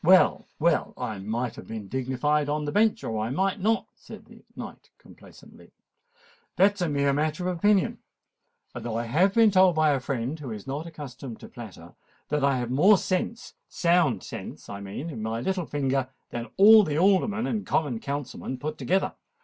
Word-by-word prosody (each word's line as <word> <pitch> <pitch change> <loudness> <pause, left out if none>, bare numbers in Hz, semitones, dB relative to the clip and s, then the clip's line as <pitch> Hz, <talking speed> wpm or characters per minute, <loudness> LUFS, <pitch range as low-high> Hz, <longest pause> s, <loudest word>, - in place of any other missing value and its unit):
"Well—well—I 160 - +2
might 115 +5 -3
have - - -10
been 110 -3 -6
dignified 130 +4 0
on 150 0 -1
the 145 - -2
bench—or 210 - +1
I 110 +2 -2
might 190 - 0
not," 220 +4 +1
said - - -13
the - - -17
knight - - -9
complacently: - - -17 0.8
"that 200 +2 +5
is 200 - -9
a 175 - +1
mere 140 -1 +1
matter 155 +5 -1
of 180 - -1
opinion—although 165 - -3
I 115 - -1
have 175 +12 +2
been 225 -2 +6
told 185 -2 +5
by 155 -1 +4
a 140 - +1
friend 130 +3 -3
who 140 -4 -7
is 110 -1 -7
not 140 +5 -4
accustomed 135 -6 -9
to - - -10
flatter, 95 -7 -11 0.4
that 150 -1 0
I 140 -1 +3
have 120 -1 -3
more 185 +11 +6
sense—sound 175 - -1
sense, - - -8
I 100 - -6
mean—in 110 +7 -6
my 110 +1 -2
little 180 +6 -2
finger, 135 -2 -1 0.2
than 120 0 -4
all 215 +2 +9
the 150 -5 -2
Aldermen 200 +5 +2
and 215 -3 -2
Common 140 -8 -1
Councilmen 140 -1 -5
put 150 +4 -5
together. 190 +2 0
145 Hz, 170 wpm, -26 LUFS, 125-185 Hz, 0.8 s, all